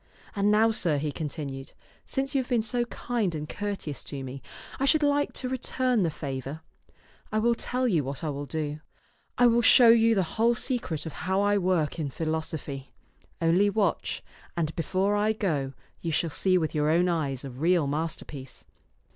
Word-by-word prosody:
And 200 0 +2
now, 220 +2 +5
sir," 170 -8 +1
he 150 +1 -2
continued, 140 -3 -5 0.3
"since 270 +1 -2
you 270 - +3
have 250 - -9
been 240 -3 +2
so 240 +2 0
kind 230 -7 -2
and 150 0 -4
courteous 200 -8 -4
to 140 -2 -5
me, 130 +1 -7 0.4
I 270 - +2
should 300 +2 +4
like 290 0 +2
to 255 - -3
return 255 -2 0
the 170 - +2
favor. 140 0 -5 0.7
I 215 - 0
will 235 +2 +3
tell 250 +2 -1
you 170 -10 +2
what 135 +2 -5
I 155 - -1
will 145 0 -5
do. 150 +1 -3 0.6
I 245 - +5
will 240 0 +5
show 235 0 +7
you 230 0 +6
the 190 - +3
whole 230 +7 +1
secret 235 - -1
of 160 - -5 0.2
how 190 +1 +3
I 205 0 +3
work 175 -4 0
in 150 -3 -1
philosophy. 155 -2 -4 0.5
Only 180 +5 +4
watch, 200 -4 0 0.3
and 160 -2 -1
before 190 +4 0
I 210 +1 +2
go 150 -11 -1 0.3
you 165 - -2
shall 160 +1 0
see 185 +4 +2
with 160 -3 -1
your 150 -1 +1
own 175 +3 +3
eyes 145 -7 -1
a 135 - -6
real 165 +5 +2
masterpiece. 145 -2 -5
175 Hz, 185 wpm, -27 LUFS, 150-225 Hz, 0.7 s, show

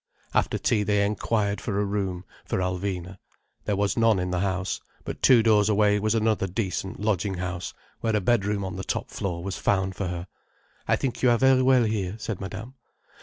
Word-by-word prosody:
After - - +1
tea 105 - +1
they 105 0 +2
inquired 105 -1 0
for 100 -2 -2
a 105 - +1
room 95 -3 -2 0.2
for - - -2
Alvina. 90 0 -3 0.5
There 105 - 0
was 100 0 0
none 115 -3 +4
in 90 0 -2
the 90 - 0
house. 95 0 -1 0.2
But - - -6
two 120 -4 +6
doors 105 -2 +4
away 105 0 +3
was 110 +2 +1
another 110 -3 +1
decent 95 0 -3
lodging 100 -2 0
house, 90 -1 -4 0.2
where 110 -1 0
a - - +3
bedroom 100 -1 +1
on 95 -1 -5
the 95 - -4
top - - -3
floor 85 -3 -3
was 95 0 -4
found 95 -1 +1
for 100 - -2
her. 85 0 -4 0.6
"I - - +4
think 120 -3 -3
you 125 - +5
are 120 - +4
very 130 +1 +5
well 130 -1 +5
here," 105 -4 -1
said 110 -3 -5
Madame. 105 +6 -6
100 Hz, 200 wpm, -26 LUFS, 95-110 Hz, 0.6 s, two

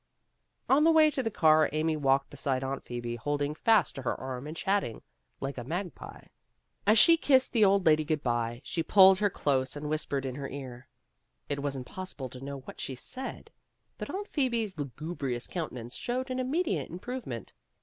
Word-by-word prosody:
On 280 +3 +5
the 325 - +6
way 315 -1 +6
to 270 - -1
the 225 - -1
car 155 -6 +4
Amy 155 +1 0
walked 135 -2 +1
beside 135 -2 -2
Aunt 135 +1 -3
Phoebe, 120 -1 -5
holding 145 +4 -1
fast 210 - +3
to 135 - -7
her 125 - -2
arm 130 +1 -5
and 155 +2 -7
chat 200 +4 +2
tering 115 - -7 0.4
like 135 -1 -4
a - - -5
magpie. 175 +6 -6
And - - -24 0.6
as 215 +2 +6
she 330 +9 +8
kissed 265 -4 +3
the 225 -3 +4
old 195 -1 +3
lady 155 -1 +5
good 155 -1 -1
by, 120 -1 -1
she 165 - -2
pulled 190 +2 +7
her 205 -1 +3
close 135 -7 0
and 150 +1 -5
whis 155 0 -1
pered 135 -1 -2
in 130 - -3
her 140 +1 -5
ear. 130 -2 -8 0.6
It 140 -1 -2
was 140 -1 -2
impossible 135 0 -6
to 125 +1 -11
know 140 0 -6
what - - -10
she 130 - -4
said, 260 - -8 0.5
but - - -5
Aunt 405 +2 -4
Phoebe's 235 - 0
lugubrious 140 -2 -4
countenance 125 -8 -5
showed 255 +2 -3
an 255 - -2
immediate 255 - -1
improve 245 +8 -6
ment. 115 -3 -6
155 Hz, 200 wpm, -29 LUFS, 135-210 Hz, 0.6 s, she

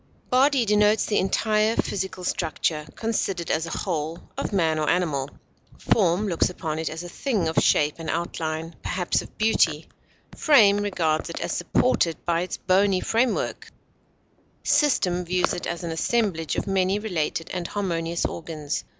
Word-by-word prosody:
Body 265 0 +4
denotes 210 +1 +3
the 210 - +1
entire 215 +3 +1
physical 190 -1 -2
structure, 155 -3 -1
considered 195 -6 -2
as 160 +1 0
a - - -4
whole, 160 -3 -2 0.2
of - - -3
man 165 -5 +1
or 155 - 0
animal; 145 -7 0 0.5
form 190 0 +2
looks 170 -4 +1
upon 160 -3 -4
it 160 - -2
as 165 +2 -6
a - - -7
thing 200 - -1
of 160 - +2
shape 150 0 +3
and 165 - -5
outline, 165 -1 -3
perhaps 180 -1 -1
of - - -14
beauty; 165 -8 +2 0.5
frame 215 -10 +5
regards 175 -6 0
it 170 - -5
as 170 - -3
supported 175 -2 +1
by 170 -1 +1
its 180 - -4
bony 190 0 +2
framework; 230 +5 0 1.0
system 180 - +2
views 180 +1 0
it 175 - -4
as 170 0 -4
an 170 - -3
assemblage 165 - 0
of - - -2
many 195 0 +1
related 170 -6 -2
and 175 -2 -3
harmonious 170 -4 -2
organs. 155 -3 -4
175 Hz, 155 wpm, -24 LUFS, 165-205 Hz, 1.0 s, frame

